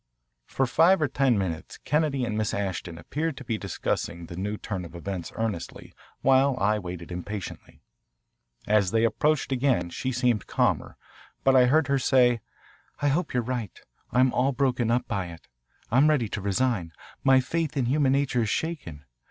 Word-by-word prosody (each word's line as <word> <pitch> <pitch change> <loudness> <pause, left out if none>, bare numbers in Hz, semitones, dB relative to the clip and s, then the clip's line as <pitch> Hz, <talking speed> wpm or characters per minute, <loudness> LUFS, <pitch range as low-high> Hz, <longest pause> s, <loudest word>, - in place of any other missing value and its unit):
For 135 - 0
five 165 +9 +4
or 155 - +2
ten 135 -3 +2
minutes 85 -5 -4
Kennedy 150 -4 0
and 115 -2 -3
Miss 110 -1 -1
Ashton 95 -4 -3
appeared 150 - -3
to 135 - -8
be 115 -3 -2
discussing 85 -2 -3
the 85 +1 -9
new 105 +4 -3
turn 95 -4 -5
of 85 0 -10
events 90 0 -5
earnestly, 110 -6 -4 0.3
while 135 0 +4
I 105 +2 +2
waited 90 -2 -7
impatiently. 95 +3 -7 0.8
As 105 -3 +3
they 115 +3 +2
approached 150 +6 +1
again 125 -10 +1
she 130 - -3
seemed 120 -4 +1
calmer, - - 0 0.5
but 135 0 +4
I 125 -1 +6
heard 155 +4 +4
her 140 -1 +2
say, 125 -3 +3 0.6
"I 145 - +2
hope 150 0 -1
you're 125 - +2
right. 120 -4 -4 0.3
I'm 125 +2 +3
all 135 +2 +2
broken 125 -3 +1
up 120 +2 +1
by 95 -3 -2
it. 85 -1 -12 0.4
I'm 135 +6 +5
ready 140 -7 +2
to 105 - -4
resign. 100 -4 0 0.3
My 135 -1 +6
faith 155 +3 -2
in 130 - +1
human 135 +1 +2
nature 135 -3 +1
is 110 - 0
shaken. 95 - -3
120 Hz, 175 wpm, -26 LUFS, 100-135 Hz, 0.8 s, I